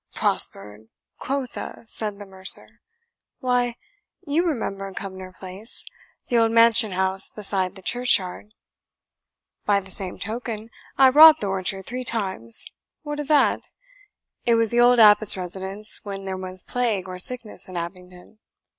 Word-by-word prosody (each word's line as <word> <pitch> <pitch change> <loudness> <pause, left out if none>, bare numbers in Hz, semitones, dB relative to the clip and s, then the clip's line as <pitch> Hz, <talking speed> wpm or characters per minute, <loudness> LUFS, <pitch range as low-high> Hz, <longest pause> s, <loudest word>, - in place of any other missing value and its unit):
"Prospered, 105 +1 -2 0.3
quotha!" 270 -4 -4
said 215 -2 -4
the 205 - -9
mercer; 190 0 -3 0.6
"why, 245 -2 0 0.5
you 305 +3 +1
remember 200 - -3
Cumnor 190 -1 -7
Place, 190 +4 -6 0.4
the 240 -2 +2
old 225 0 +3
mansion 230 -2 +5
house 190 +1 +1
beside 195 -3 -2
the 190 - -13
churchyard?" 215 -3 +1 1.1
"By 200 -1 +3
the 190 -1 -12
same 185 -1 -5
token, 225 0 -5 0.3
I 265 -1 +7
robbed 310 +3 +9
the - - -2
orchard 190 0 -2
three 250 +2 -4
times 190 - -2 0.4
what 295 -1 -5
of 295 - -4
that? 300 -1 +3 0.8
It 235 - +3
was 230 -1 +1
the 240 - +2
old 245 0 +6
abbot's 210 -2 +6
residence 190 +3 -4
when 195 -1 -7
there 190 0 -3
was 185 -1 -7
plague 225 -7 -1
or 185 0 -7
sickness 235 -1 -3
at 185 - -9
Abingdon." 180 +3 -8
210 Hz, 140 wpm, -23 LUFS, 190-240 Hz, 1.1 s, robbed